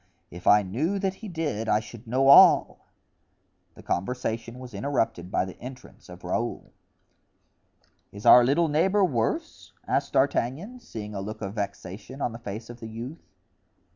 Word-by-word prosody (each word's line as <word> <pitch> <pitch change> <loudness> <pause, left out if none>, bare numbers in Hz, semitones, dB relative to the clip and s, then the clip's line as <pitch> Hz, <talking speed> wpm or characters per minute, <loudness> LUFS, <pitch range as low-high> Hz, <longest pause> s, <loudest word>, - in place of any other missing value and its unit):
if 90 +1 -9
I 105 0 +6
knew 145 - -1
that 195 -1 -1
he 220 +3 -10
did 150 - -3
I 105 - +3
should 115 +1 -12
know 130 +4 +2
all." 140 - +6 0.9
The - - -14
conversation 115 +3 -3
was 125 -2 -10
interrupted 110 -5 -2
by 95 - 0
the 95 - -9
entrance 125 -5 -11
of 90 0 -12
Raoul. 115 +7 -3 1.4
"Is 100 +1 -11
our 125 - +9
little 145 +7 +2
neighbor 190 +7 +2
worse?" 120 -10 -3
asked - - -1
D'Artagnan, 170 - 0
seeing 110 - -8
a 100 - -4
look 110 +2 -7
of 100 0 -4
vexation 105 +3 -6
on 125 - -1
the 115 - -9
face 110 +1 -7
of 120 0 -11
the 115 - -8
youth. 120 +8 -8
115 Hz, 160 wpm, -26 LUFS, 105-140 Hz, 1.4 s, our